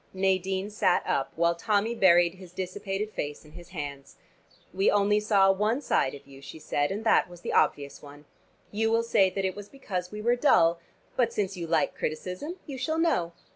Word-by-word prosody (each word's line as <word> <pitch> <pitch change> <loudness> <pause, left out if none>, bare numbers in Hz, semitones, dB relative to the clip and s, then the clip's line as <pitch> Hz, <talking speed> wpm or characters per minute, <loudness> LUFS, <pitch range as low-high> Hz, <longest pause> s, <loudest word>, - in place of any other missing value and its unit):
Nadine 190 +1 0
sat 205 -3 +1
up, 135 - -1
while 170 +1 +2
Tommy 210 +6 0
buried 175 -5 +4
his 185 -2 -14
dissipated 195 +3 -4
face 145 -3 -5
in 150 - -16
his 175 +1 -13
hands. 145 -5 -7 0.6
"We 195 +2 +2
only 205 +1 +3
saw 200 -2 +4
one 210 +6 0
side 145 - 0
of 140 - -13
you," 135 -1 -14
she 140 +3 -10
said, 145 -1 -1
"and 205 +3 -4
that 220 - +3
was 175 -1 -13
the - - -4
obvious 140 -1 +1
one. 145 0 -13 0.5
You 225 +2 0
will 230 +1 +2
say 195 -5 +3
that 195 +1 -3
it 185 - -2
was 205 0 -9
because 185 -10 -5
we 210 - -7
were 240 +2 +3
dull. 170 - +4 0.4
But 235 -2 +2
since 200 -3 -2
you 170 -2 -5
like - - +1
criticism 180 - -4
you 270 -3 -7
shall 315 +4 -1
know. 290 - +1
190 Hz, 200 wpm, -27 LUFS, 170-210 Hz, 0.6 s, buried